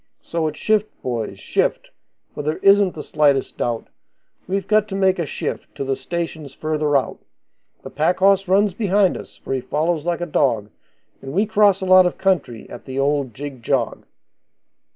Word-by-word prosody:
So, 165 -1 -2
it's 155 - -5
shift, 215 -1 +1
boys, 120 -4 -3
shift, - - -1 0.4
for - - -5
there 155 +2 -2
isn't 200 -1 +5
the 150 - -6
slightest 145 -3 +1
doubt 120 -1 -2 0.6
We've 195 +2 -2
got 215 -1 +3
to 195 - -5
make 190 -1 +2
a 165 - -1
shift - - -5
to - - -3
the 135 0 -1
stations 160 -3 -5
further 150 -2 +1
out; 135 - -3 0.6
The - - -9
pack 165 +4 +1
horse 195 0 +3
runs 195 +1 +3
behind 200 -2 +2
us, - - -10
for - - -5
he 130 - -1
follows 155 +3 -1
like 175 0 -1
a - - -1
dog, 115 -10 0 0.5
And 135 - -7
we 200 +6 +2
cross 205 -2 +3
a - - -2
lot 185 -1 +7
of 180 - -4
country 170 - -1
at 120 - -11
the 130 0 -6
old 140 -4 0
jig 140 -2 -7
jog. 125 0 -1
160 Hz, 185 wpm, -21 LUFS, 135-190 Hz, 0.6 s, lot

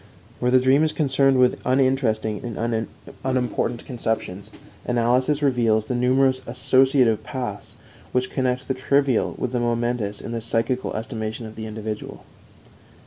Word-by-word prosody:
Where 125 - +1
the 130 +1 +5
dream 130 +3 +4
is 155 - +1
concerned 135 -2 +2
with 125 -1 +3
uninteresting 130 -5 +1
and 115 -1 -2 0.4
unimportant 125 -2 -1
conceptions, 110 -6 -3 0.3
analysis 125 +5 +1
reveals 115 -5 +2
the 125 - -3
numerous 130 +1 +2
associative 130 -1 +3
paths 125 -7 -6 0.4
which 125 0 0
connect 130 0 -1
the 135 - 0
trivial 135 -1 +1
with 125 - -2
the 125 - 0
momentous 120 -3 -1
in - - -7
the 115 -1 -3
psychical 115 +3 -1
estimation 110 0 -4
of 110 0 -9
the 110 0 -6
individual. 110 0 -6
125 Hz, 140 wpm, -23 LUFS, 110-130 Hz, 0.4 s, the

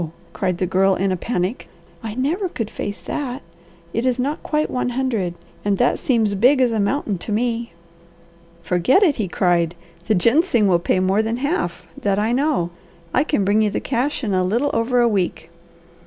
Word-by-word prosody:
cried 185 -3 -1
the 185 - 0
Girl 190 +1 +3
in 195 +1 0
a - - +1
panic. 185 +2 -2 0.3
"I 220 -1 -5
never 330 - -1
could 225 -9 -4
face 205 0 -5
that! 270 -2 -4 0.5
It 230 - 0
is 255 -1 +1
not 285 +4 -1
quite 305 0 0
one 250 - -1
hundred, 235 -9 -1 0.3
and 205 -1 +1
that 245 - +2
seems 225 -5 +1
big 250 +8 +4
as 250 -2 +3
a 220 - 0
mountain 205 -2 0
to 210 - -6
me." 230 -1 -1 0.9
"Forget 180 - +3
it!" 315 -8 +3
he 215 -4 -1
cried. 175 -1 +1 0.3
"The 215 - +3
ginseng 235 - +3
will 175 -3 +4
pay 180 - +1
more 190 +3 +2
than 225 +2 -2
half; 265 - -2 0.2
that 200 -1 +1
I 215 +3 +1
know. 255 - +1 0.4
I - - +3
can 290 -10 0
bring 205 +2 +3
you 215 - +2
the - - -2
cash 265 +3 -1
in 210 -4 -1
a 185 0 +2
little 235 +10 +1
over 240 +2 +2
a 240 - +4
week." 190 -5 -1
225 Hz, 195 wpm, -21 LUFS, 190-255 Hz, 0.9 s, big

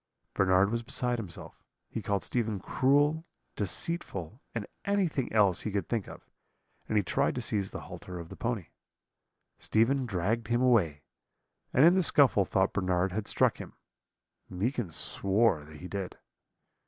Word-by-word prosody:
"Bernard 95 +1 +3
was 115 0 -1
beside 125 0 -1
himself; 95 -7 -8 0.2
he - - -5
called 100 -2 -1
Stephen 110 -4 -1
cruel, 145 - +2 0.3
deceitful, 105 - -3
and 110 -3 -2 0.2
anything 185 -10 0
else 100 -5 +3
he - - -3
could 100 -3 -2
think 115 -5 -2
of, - - -12 0.6
and 110 - +1
he 105 - +3
tried - - 0
to - - -2
seize 100 -2 -1
the - - -7
halter 90 -1 -8
of 85 -1 -8
the - - -9
pony. 115 -7 -3 0.9
"Stephen 125 +4 +2
dragged 110 +3 -1
him 120 0 +1
away, 85 - +3 0.7
and 135 - +5
in 170 - +7
the 190 - +3
scuffle 135 - +4
thought 95 +1 +1
Bernard 95 -1 +1
had 105 +2 -3
struck - - +2
him; - - -8 0.8
Meekin 110 +3 -2
swore 95 +1 +1
that 75 0 -12
he 90 - -8
did. 95 -1 -5
105 Hz, 155 wpm, -30 LUFS, 95-125 Hz, 0.9 s, in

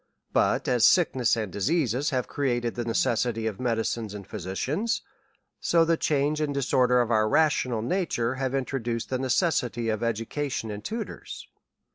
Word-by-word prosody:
But - - +2
as 125 -3 +2
sick 175 +4 +5
ness 120 -2 +2
and 110 -4 -3
diseases 135 - +1
have 130 -2 -1
created 120 -4 -1
the 120 - -3
necessity 115 -1 0
of 105 -3 -3
medi 115 -3 0
cines 110 -2 -3
and 100 -2 -8
physicians, 135 - -2 0.6
so 165 -1 +3
the 165 0 +3
change 150 0 0
and 150 -1 0
disorder 125 -2 +3
of 120 -1 -1
our 110 -1 +3
rational 130 -7 +2
nature 125 -5 0
has 135 0 -2
introduced 120 -4 -2
the 130 - 0
necessity 125 - 0
of 110 -1 -1
education 115 +1 -2
and 105 0 -7
tutors. 230 - -6
125 Hz, 160 wpm, -26 LUFS, 115-145 Hz, 0.6 s, sick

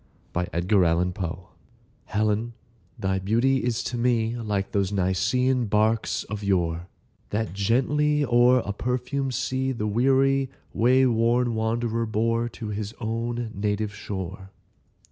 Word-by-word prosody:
1829. 90 0 +1
TO 95 - -8
HELEN 85 +1 -4 0.6
Helen, 110 +2 0 0.4
thy 95 0 -1
beauty 115 +8 +2
is 120 -1 -1
to 120 - -3
me 115 -1 +1
Like 105 -4 -2
those 100 -1 0
Nicean 115 +7 +1
barks 110 +2 +1
of 105 0 -6
yore, 85 -3 0 0.4
That 110 -2 -2
gently, 145 +8 +2
o'er 120 0 +4
a 100 - -2
perfumed 125 +4 -2
sea, 130 0 -1
The 115 -4 -3
weary 135 +4 +2 0.2
way 130 +3 +4
worn 120 0 +2
wanderer 115 +1 -1
bore 115 +2 0
To 110 -1 -7
his 105 +1 -4
own 115 0 -3
native 105 +1 -1
shore. 95 -1 -6
110 Hz, 125 wpm, -25 LUFS, 100-125 Hz, 0.6 s, o'er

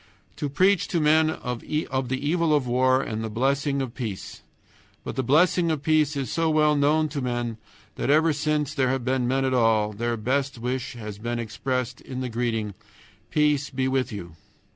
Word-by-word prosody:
To 145 - -2
preach 185 +7 +3
to 175 - 0
men 155 +1 +4
of 125 -6 -4
the 130 -3 -2
evil 165 -1 +2
of 145 -3 +1
war 130 +2 +3
and 110 0 -4
the 110 - -3
blessing 140 +4 0
of 125 -3 -6
peace! 110 -8 -6 0.6
But - - -5
the 130 - 0
blessing 165 +6 +3
of 155 -3 -1
peace 155 -2 +2
is 135 -5 -3
so 165 0 +1
well 150 -1 +3
known 150 +2 +3
to 140 -1 -4
men 120 -2 -2 0.4
that, - - -2
ever 155 +2 +4
since 150 0 -1
there 130 -3 +1
have 130 -2 -1
been 130 -1 +1
men 135 +1 +1
at 130 - 0
all, 110 -3 +2
their 120 +2 -2
best 135 +4 -1
wish 125 +2 -3
has 105 -4 -8
been 120 +2 -3
expressed 125 +2 -3
in 130 -1 -6
the 130 - -3
greeting, 115 -3 -2 0.6
"Peace 150 -2 +2
be 130 -1 -1
with 130 -1 0
you." 85 -6 -7
130 Hz, 190 wpm, -25 LUFS, 120-150 Hz, 0.6 s, men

